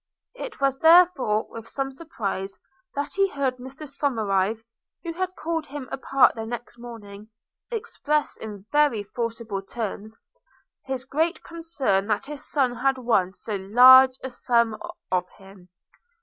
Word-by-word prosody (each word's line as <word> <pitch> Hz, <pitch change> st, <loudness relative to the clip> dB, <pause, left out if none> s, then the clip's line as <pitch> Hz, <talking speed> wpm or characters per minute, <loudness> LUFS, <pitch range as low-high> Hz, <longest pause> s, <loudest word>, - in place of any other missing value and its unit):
It -, -, -8 dB
was 275 Hz, -1 st, +1 dB
therefore 320 Hz, -10 st, +5 dB
with 230 Hz, 0 st, -9 dB
some 270 Hz, +1 st, -3 dB
surprise 200 Hz, -, -5 dB, 0.4 s
that 285 Hz, 0 st, -3 dB
he 390 Hz, 0 st, +3 dB
heard 275 Hz, -5 st, -1 dB
Mr 265 Hz, +4 st, -10 dB
Somerive, 220 Hz, -6 st, 0 dB, 0.4 s
who 335 Hz, -1 st, -4 dB
had 370 Hz, +2 st, -3 dB
called 325 Hz, -1 st, -3 dB
him 280 Hz, -2 st, -7 dB
apart 270 Hz, 0 st, +3 dB
the 225 Hz, -, -5 dB
next 240 Hz, +1 st, -7 dB
morning, 215 Hz, -3 st, -10 dB, 0.4 s
express, 300 Hz, -, -2 dB
in 205 Hz, -3 st, -9 dB
very 295 Hz, -8 st, +3 dB
forcible 225 Hz, -2 st, -4 dB
terms, 215 Hz, +1 st, -6 dB, 0.7 s
his 265 Hz, -1 st, -4 dB
great 320 Hz, +6 st, -1 dB
concern 285 Hz, -, -1 dB
that 215 Hz, +4 st, 0 dB
his 295 Hz, 0 st, -8 dB
son 255 Hz, -4 st, +1 dB
had 270 Hz, +2 st, +1 dB
won 220 Hz, -7 st, +1 dB
so 205 Hz, +3 st, -5 dB
large 255 Hz, +6 st, +7 dB
a 260 Hz, -, -5 dB
sum 235 Hz, -3 st, +1 dB, 0.4 s
of 180 Hz, -1 st, 0 dB
him. 195 Hz, -2 st, -16 dB
250 Hz, 140 wpm, -25 LUFS, 215-290 Hz, 0.7 s, large